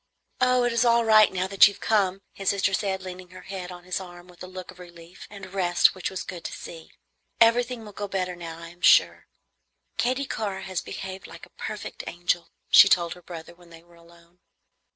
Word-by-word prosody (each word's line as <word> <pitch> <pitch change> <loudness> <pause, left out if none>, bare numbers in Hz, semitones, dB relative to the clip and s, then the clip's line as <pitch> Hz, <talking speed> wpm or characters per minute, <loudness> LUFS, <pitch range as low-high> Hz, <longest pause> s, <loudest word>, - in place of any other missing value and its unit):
"Oh, 250 0 +3
it 245 -1 +1
is 235 +1 +2
all 235 -1 +3
right 215 -1 +6
now 185 0 -1
that 195 +1 +6
you 200 - -4
have - - -18
come," 195 -3 +1
his 195 - -2
sister 200 0 +1
said, 190 -1 -1
leaning 185 -1 -9
her 185 +1 -13
head 185 -2 -7
on 175 0 -11
his 180 +1 -3
arm 175 -1 -11
with 180 -1 -18
a 185 - -7
look 185 0 -9
of 185 - -19
relief 175 -1 -13
and 195 -2 -11
rest 175 -3 +3
which 185 - -4
was 190 -2 -5
good 175 -3 -8
to - - -4
see. 165 -1 -10 0.5
"Everything 235 0 +3
will 210 - -10
go 205 0 -5
better 185 -2 -3
now, 165 -2 -8
I 165 0 -10
am 175 +1 -18
sure." - - +4 0.7
"Katy 255 +3 0
Carr 200 -6 -4
has 185 -2 -4
behaved 190 0 -7
like - - -12
a - - -25
perfect - - -7
angel," 175 0 -2 0.2
she - - +9
told 170 -2 +2
her 180 - -15
brother 170 -1 -10
when 175 0 -20
they 165 0 -15
were 175 0 -23
alone. 170 +1 -21
185 Hz, 220 wpm, -25 LUFS, 175-200 Hz, 0.7 s, she